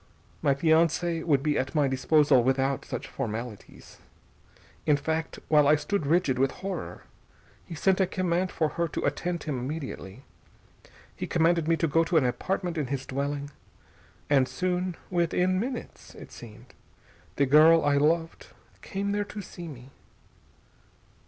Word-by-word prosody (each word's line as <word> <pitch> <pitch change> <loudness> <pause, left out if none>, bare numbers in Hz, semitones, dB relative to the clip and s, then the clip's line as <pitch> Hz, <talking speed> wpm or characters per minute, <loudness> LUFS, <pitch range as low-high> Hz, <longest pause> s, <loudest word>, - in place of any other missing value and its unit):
My 140 - +2
fiancée 165 +2 +2
would 140 -5 +2
be 150 -1 +1
at 130 +4 -3
my 145 -2 +3
disposal 135 0 +3
without 135 +1 0
such - - -5
formalities. 115 -3 -7 0.9
In 150 -2 +4
fact 160 +2 -3
while 150 -2 +4
I 150 - +6
stood 155 +1 -2
rigid 150 -5 +2
with 135 0 +3 0.2
horror 195 -1 -5 0.6
he 170 - -7
sent 190 +4 +2
a 190 - +3
command 185 0 -1
for 155 -2 0
her 170 +2 -1
to - - -4
attend 175 -2 -2
him 140 -5 -3
immediately. 130 -5 -6 0.9
He - - -5
commanded 165 -1 +2
me 165 0 +3
to 165 - +1
go 165 +3 +3
to 165 - +1
an 145 - +3
apartment 175 +6 -2
in 145 - -2
his 135 0 -3
dwelling. 140 +1 -3 0.8
And 135 -3 +3
soon 180 +1 -2
within 180 +1 +1
minutes, 250 +3 -6
it - - -12
seemed 115 +1 -13 0.6
the 140 - +3
girl 155 +4 +6
I 145 -1 +3
loved 165 +3 0 0.3
came 200 0 -3
there 205 0 -1
to 205 -4 -9
me...." 130 -3 -11
155 Hz, 150 wpm, -27 LUFS, 135-175 Hz, 0.9 s, I